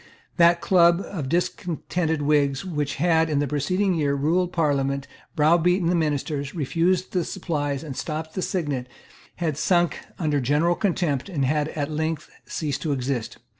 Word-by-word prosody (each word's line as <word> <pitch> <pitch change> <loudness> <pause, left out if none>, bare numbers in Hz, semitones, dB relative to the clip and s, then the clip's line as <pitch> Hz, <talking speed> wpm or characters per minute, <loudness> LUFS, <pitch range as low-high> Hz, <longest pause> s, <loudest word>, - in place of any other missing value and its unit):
That 170 -1 +5
club 170 0 +4
of 155 -9 -4
discontented 170 -2 -1
Whigs 145 0 +2
which 150 -5 -2
had, 160 0 +2
in 150 - 0
the 145 - +2
preceding 180 +8 0
year, 145 -4 +1
ruled 170 +6 +1
the - - -16
Parliament, 140 -4 0 0.3
browbeaten 170 +3 +3
the 180 - +2
ministers, 145 -2 -1
refused 170 +4 0
the 180 -2 0
supplies 145 -6 -3
and 145 -4 -6
stopped 155 +2 -4
the 185 - -3
signet, 145 -10 -2 0.5
had 155 -4 -2
sunk 175 0 +2 0.2
under 150 -4 0
general 150 +7 +2
contempt, 175 -6 -1
and 145 -8 0
had 150 +2 +1
at 145 -1 -3
length 160 +1 -2 0.2
ceased 145 -4 -3
to 155 -3 0
exist. 130 -3 -3
155 Hz, 160 wpm, -24 LUFS, 145-175 Hz, 0.5 s, That